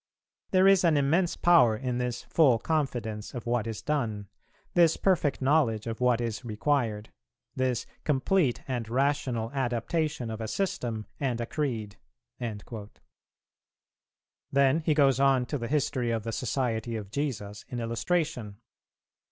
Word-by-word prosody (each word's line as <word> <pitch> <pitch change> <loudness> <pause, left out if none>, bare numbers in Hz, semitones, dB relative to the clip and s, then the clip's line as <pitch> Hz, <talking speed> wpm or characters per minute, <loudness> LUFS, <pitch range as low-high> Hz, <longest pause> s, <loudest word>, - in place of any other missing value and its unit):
There 185 0 +5
is 195 -2 +5
an 165 -4 +4
immense 165 +6 +2
power 155 -11 +5
in 125 0 -2
this 125 -1 -3
full 140 -8 +4
confidence 120 -7 -2
of 120 - -6
what 120 -2 0
is 110 -2 -5
done; 110 -9 -2 0.4
this 170 -2 +4
perfect 160 -8 +1
knowledge 130 -7 +2
of 115 +1 -5
what 125 -2 +3
is 115 -1 -3
required; 110 -2 -1 0.4
this 130 -2 0 0.2
complete 145 0 +1
and 120 -4 -3
rational 125 -3 0
adaptation 135 +1 -1
of 110 0 -5
a 110 - -3
system 120 - -2
and 130 -4 -1
a 120 - -1
creed." 115 -8 -3 2.5
Then 140 +2 +4
he 155 -1 +1
goes 135 -3 +4
on 135 -2 +4
to 145 +3 -3
the 115 - -3
history 130 -4 0
of 115 -2 -1
the 115 - -3
Society 115 -1 -2
of 105 -3 -6
Jesus 105 -7 -3
in 125 - -4
illustration. 115 - -2
125 Hz, 140 wpm, -28 LUFS, 115-145 Hz, 2.5 s, There